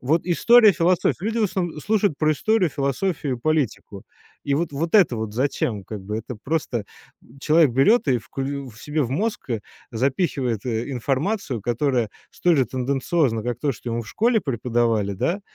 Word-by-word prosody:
Вот 155 +6 +1
история, 220 +5 +6
философия. 180 +1 +2
Люди 225 +1 -1
в - - +2
основн 175 -6 -2
слушают 205 -4 +1
про 155 -1 +2
историю, 185 +2 +1
философию 140 +1 -1
и - - -16
политику. 130 -9 -2 0.4
И 140 - +1
вот, 165 +2 -1
вот 140 +1 -6
вот 165 +4 -2
это 175 - +5
вот 110 -1 -4
зачем, 120 -5 -1
как 100 +1 -8
бы? 105 +2 -3
Это 115 +2 -6
просто, 125 -3 -2 0.4
м, 130 +4 -19
человек 155 -2 +4
берёт 145 - +4
и 130 -3 +2
вклю 135 +3 -5
в 110 -1 -14
себе 150 0 -1
в 125 - -3
мозг, 205 - -2
э, 115 -3 -1 0.3
запихивает, 130 - -1
э, 115 0 -2
информацию, 135 - -1
которая 120 0 0 0.2
столь 175 -4 +2
же 130 - +4
тенденциозна, 130 -1 0
как 120 0 -3
то, 145 +1 0
что 120 0 -7
ему 115 0 -2
в 110 - -13
школе 230 - +2
преподавали, 115 - 0
да, 170 - -1
140 Hz, 185 wpm, -23 LUFS, 120-170 Hz, 0.4 s, история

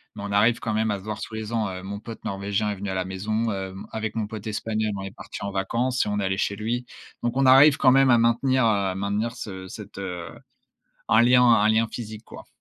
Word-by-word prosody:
Mais - - -7
on 100 - -5
arrive 110 +4 +3
quand 110 - -3
même 110 +1 +1
à 100 - -1
se - - -14
voir 105 0 -5
tous 110 - -6
les 110 +1 -5
ans, 110 -2 0
heu, 95 0 -7
mon 100 +1 -6
pote 115 +1 -10
norvégien 100 +1 -1
est - - -3
venu 100 +1 -5
à 95 - -3
la 95 -1 -1
maison. 110 +4 -2
Hem, 95 -1 -5
avec 110 0 -4
mon 110 -2 -1
pote 110 0 -7
espagnol, 110 0 -2
on 95 - -5
est 95 - -6
partis - - -9
en 100 - -3
vacances 115 +6 0
et - - -3
on 105 0 -1
est - - -1
allés 95 0 -1
chez 100 - 0
lui 120 +4 -3 0.4
donc 120 +1 -1
on 135 - +3
arrive 135 +3 +7
quand 130 - +5
même 135 0 +5
à 120 - +6
maintenir, 120 +2 +2
heu, 100 -4 +1
maintenir 100 +4 -2
ce 95 -5 -7
cette, 100 +1 -10
heu, 90 -3 -5 0.8
un 110 - +6
lien 125 +1 +5
un 115 -3 +5
lien 110 +1 +3
physique, 110 -2 -7
quoi. - - -12
110 Hz, 255 wpm, -24 LUFS, 100-115 Hz, 0.8 s, arrive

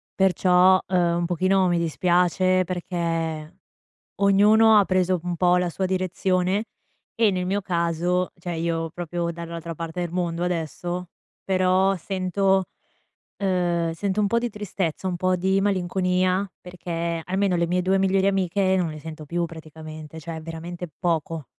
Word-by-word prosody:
Perciò, 185 -1 +4
ehm, 175 -2 +2
un 175 - 0
pochino 185 +2 +2
mi 175 - +2
dispiace, 180 +2 +2
perché 165 -3 -3 0.7
ognuno 210 +2 +6
ha 200 - +3
preso 185 -1 +1
un 175 -1 -2
po' 180 +1 +4
la 180 -1 0
sua 190 +3 -2
direzione 185 +2 0 0.5
e, 225 -3 +3
nel 180 -1 -2
mio 200 +2 0
caso, 175 0 0
cioè 175 0 -4
io 165 0 -1
proprio 175 0 -3
dall'altra 170 0 -6
parte 165 +2 -5
del 175 -2 -3
mondo 175 -1 -2
adesso, 175 +1 -3 0.3
però 190 +1 +2
sento 190 +1 0 0.7
ehm, 175 -4 0
sento 195 +4 -1
un 205 - +3
po' 235 +3 +2
di 240 - -1
tristezza, 190 -4 -3
un 175 - -2
po' 185 +1 +1
di 190 +2 +1
malinconia, 185 0 +1
perché 170 -2 -4
almeno 190 0 +1
le 170 0 +1
mie 180 +1 0
2 190 +2 +2
migliori 195 0 +2
amiche 190 0 +1
non 175 -3 0
le 155 -1 -8
sento 155 -1 -9
più, 170 +3 -1
praticamente, 155 -1 -10
cioè 160 +1 -6
veramente 165 +2 -7
poco. 165 -3 -1
180 Hz, 150 wpm, -24 LUFS, 170-190 Hz, 0.7 s, ognuno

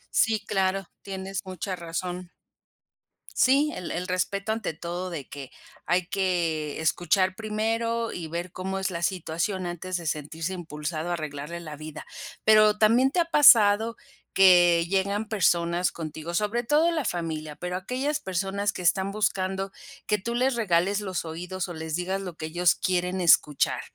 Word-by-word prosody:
Sí, 220 -1 +3
claro, 195 0 0 0.2
tienes 195 0 -5
mucha 185 0 -4
razón. 180 +1 -5 1.0
Sí, 280 +4 +4
el 180 - -6
el 180 +2 -3
respeto 195 +3 -1
ante 220 -6 -2
todo, 175 +3 -5
de 160 -6 -6
que 140 -2 -8 0.4
hay 180 0 +2
que 170 -6 -1
escuchar 185 +3 +1
primero 225 +2 -1
y 170 -2 -5
ver 170 +2 -5
cómo 190 +2 -4
es 190 0 -2
la 170 -1 -4
situación 180 +1 -2
antes 175 +1 -4
de 170 - -8
sentirse 160 +4 -3
impulsado 160 -1 -5
a - - 0
arreglarle 155 +1 -5
la 155 -3 -8
vida, 155 +1 -9 0.4
pero, 215 -1 +6
¿también 230 +5 +4
te 355 - 0
ha 340 - +3
pasado 230 -8 +6 0.4
que 175 -3 +6
llegan 200 +3 0
personas 175 -4 +2
contigo, 160 +1 -6
sobre 210 +6 0
todo 300 +7 +3
la 315 -5 -1
familia, 160 -5 -3
pero 180 +3 -4
aquellas 260 +10 -2
personas 195 - -1
que - - -6
están 190 +3 +2
buscando 195 -2 -1 0.4
que 210 - +2
tú 235 +5 -4
les 255 +2 +1
regales 200 -2 +1
los 190 -3 -3
oídos, 180 +3 -5
o - - -5
les 160 -1 -4
digas 190 +2 -2
lo 180 -4 -7
que 155 - -5
ellos 175 +1 +2
quieren 180 0 -1
escuchar?, 155 -4 +3
185 Hz, 160 wpm, -26 LUFS, 170-205 Hz, 1.0 s, pero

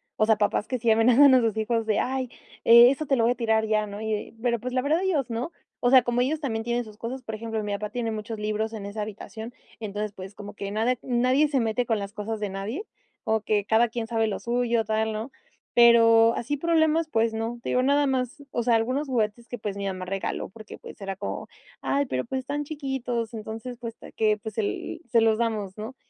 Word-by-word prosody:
o 215 - +3
sea, 220 -1 +4
papás 205 0 0
que 255 - -1
sí 230 0 +1
amenazan 250 +5 +6
a 255 - +5
sus 225 -2 0
hijos 225 +1 0
de: 215 -1 +1
"Ay, 260 -1 -1 0.4
eh, 235 +2 +9
eso 295 +3 -3
te 275 - +2
lo 235 - +2
voy 235 - +4
a - - -19
tirar 220 -2 +1
ya, 215 -1 +1
¿no?". 205 0 -7
Y 220 0 -2
de 210 - -4
pero 235 -1 +1
pues 250 +3 -5
la 255 - +2
verdad, 305 +6 +1
ellos 320 -10 0
no. 235 +8 -3 0.3
O 245 - +4
sea, 260 -1 +7
como 240 0 +1
ellos 295 +5 0
también 225 -7 -2
tienen 240 +1 -1
sus 215 -2 -13
cosas, 250 +4 -5
por 220 - -6
ejemplo, 220 0 -3
mi 205 0 -2
papá 210 +1 -3
tiene 235 -1 -2
muchos 220 +1 -5
libros 215 +1 -1
en 210 -3 -6
esa 205 +2 -5
habitación, 220 +2 -7 0.3
entonces, 210 -1 -4
pues 190 +1 -9
como 205 0 -9
que 200 -1 -5
nada 225 +4 +1
nadie 255 +4 +2
se 285 -2 +1
mete 230 +1 0
con 225 - +2
las 200 0 -6
cosas 215 +1 -4
de 210 -1 -2
nadie, 200 - -4 0.4
como 220 0 +1
que 210 -1 0
cada 225 +2 +3
quien 230 0 -3
sabe 225 -1 +1
lo 210 - -3
suyo, 235 -1 0
tal, 220 0 0
¿no? 220 +5 -5 0.4
Pero 230 -1 +6
así 290 +5 -2
problemas, 320 0 +2
pues 225 -3 +1
no. 225 +2 -3
Te - - -4
digo, 250 - +2
nada 285 +2 +3
más, 260 +1 -2
o 240 - -1
sea, 235 0 +3
algunos 255 +6 0
juguetes 235 -2 -1
que, 245 - -6
pues, 205 -2 -4
mi 200 - -3
mamá 185 -1 -3
regaló 195 +1 -3
porque, 215 +2 -11
pues, - - -12
era 195 0 -4
como: - - -5 0.3
"Ay, 285 +1 +1
pero 130 - -2
pues 265 - -2
están 285 +3 -3
chiquitos". 265 -6 -3
Entonces, 225 +3 -6
puesto 230 -2 -8
que, 215 -1 +3
pues 215 +1 -8
el: 205 - -3
"Se 230 0 +4
los 220 -1 +3
damos, 215 -4 -2
¿no?". 220 +5 -6
230 Hz, 240 wpm, -26 LUFS, 215-250 Hz, 0.4 s, eh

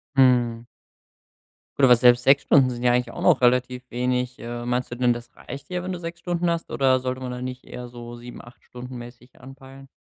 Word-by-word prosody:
Mhm. 120 -3 +3 1.1
Gut, 140 - 0
aber 125 -2 +8
selbst 125 0 +5
6 135 +1 +5
Stunden 135 -3 +4
sind 120 0 -6
ja 120 0 +4
eigentlich 125 -1 0
auch - - -8
noch - - +4
relativ 125 +1 +2
wenig. 125 0 -2
Äh, 120 0 -6
meinst 125 0 -2
du - - -4
denn, 125 0 +2
das 120 0 -6
reicht 140 - -9
dir, 180 -1 -3
wenn 185 - -4
du 180 - -5
6 170 0 -7
Stunden 175 -1 -1
hast 170 0 -3
oder 130 -2 +2
sollte 130 0 -3
man 125 -1 -5
da 125 0 -6
nicht 125 0 -6
eher 125 0 -8
so 120 0 -9
7, 120 +1 -10
8 120 0 -17
Stunden 125 0 -9
mäßig 120 +1 -13
anpeilen? 135 0 -13
125 Hz, 220 wpm, -24 LUFS, 120-135 Hz, 1.1 s, aber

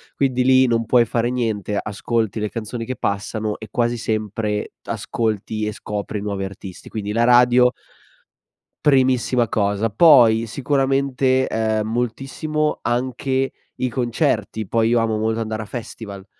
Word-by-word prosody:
quindi 130 -2 +1
lì 130 0 +5
non 115 -1 +1
puoi 120 0 +4
fare 115 +1 -1
niente, 110 -5 -2
ascolti 110 +1 -2
le 105 -1 -2
canzoni 115 +1 -5
che 130 +1 -4
passano 105 +1 -2
e 110 - -8
quasi 120 0 0
sempre 110 -2 -2
ascolti 110 -1 -2
e 105 - -3
scopri 105 0 -5
nuovi 100 -2 -3
artisti. 95 -1 -10
Quindi 105 -2 -4
la 115 +2 +2
radio 125 0 +5 1.1
primissima 130 -3 +3
cosa. 105 +2 0
Poi, 115 -5 +6
sicuramente, 135 0 +1
ehm, 110 -1 0
moltissimo 135 +6 -2
anche 130 +2 -1 0.2
i 130 - -1
concerti. 115 - -1
Poi 115 +1 +2
io 120 - +3
amo 110 -1 0
molto 110 +1 0
andare 110 -1 -3
a 110 - -6
festival, 105 -4 -8
115 Hz, 140 wpm, -21 LUFS, 110-125 Hz, 1.1 s, Poi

